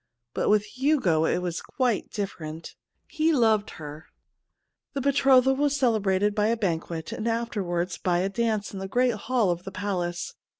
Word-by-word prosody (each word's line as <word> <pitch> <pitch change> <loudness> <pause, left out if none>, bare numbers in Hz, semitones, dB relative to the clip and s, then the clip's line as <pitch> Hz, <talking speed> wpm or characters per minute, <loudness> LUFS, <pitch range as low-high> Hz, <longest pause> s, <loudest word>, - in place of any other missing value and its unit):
But - - 0
with 210 0 +4
Hugo 250 - +1
it 180 - 0
was 175 -2 -3
quite 245 -6 -1
different 165 -6 -6 0.2
— - - -50
he 320 +1 +4
loved 220 -7 +3
her. 150 +1 -9 0.9
The 275 - -2
betrothal 265 -1 +4
was 285 +1 +1
celebrated 210 -5 +2
by 210 0 +1
a 230 +1 +1
banquetj 165 -5 -2
and 220 - -3
afterwards 190 -7 -2
by 175 -2 +1
a 190 - +1
dance 215 -1 -1
in 195 - -5
the 195 - -4
great 245 +4 +2
hall 225 -2 +1
of 175 +1 -4
the 195 - -7
palace. 175 -3 -3
210 Hz, 170 wpm, -26 LUFS, 175-245 Hz, 0.9 s, with